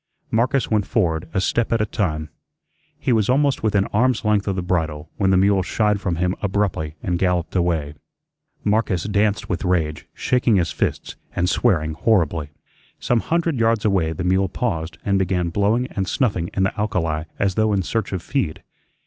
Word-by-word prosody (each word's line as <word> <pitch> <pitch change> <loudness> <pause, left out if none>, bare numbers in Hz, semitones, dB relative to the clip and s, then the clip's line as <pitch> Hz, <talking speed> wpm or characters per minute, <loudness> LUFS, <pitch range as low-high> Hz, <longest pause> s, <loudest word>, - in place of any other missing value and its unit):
Marcus 120 +2 +1
went 105 -3 +1
forward 80 -8 0
a 95 - 0
step 115 +4 0
at 115 - +2
a 105 - +2
time. 80 -8 -2 0.7
He 125 - 0
was 110 -1 +2
almost 140 +1 +2
within 105 -3 +2
arm's 120 +2 +2
length 105 -1 +2
of 95 - 0
the 90 - -2
bridle 80 -4 -2
when 95 - +2
the 95 - +4
mule 100 0 +4
shied 105 +1 0
from 90 -4 -1
him 90 +2 0
abruptly 95 -6 -1
and 90 -1 -1
galloped 90 -2 0
away. 85 -5 0 0.7
Marcus 105 -4 +1
danced 105 0 0
with 85 -4 -2
rage, 80 -4 -1
shaking 125 -3 +2
his 90 -3 +1
fists, - - -2 0.2
and 90 - +1
swearing 80 -7 +1
horribly. 80 -6 +1 0.5
Some 120 - +1
hundred 165 -1 0
yards 115 -1 +2
away 95 -6 +2
the 80 +3 -4
mule 95 +1 +2
paused 85 -10 -3
and 100 -1 +2
began 90 -2 0
blowing 105 +7 +1
and 95 -2 -2
snuffing 95 -7 0
in 95 - +2
the 95 - 0
alkali 85 -7 -1
as 100 -1 +1
though 110 +2 +2
in 100 -2 +1
search 115 +4 -2
of 95 -3 -3
feed. 95 - -2
95 Hz, 185 wpm, -22 LUFS, 85-110 Hz, 0.7 s, the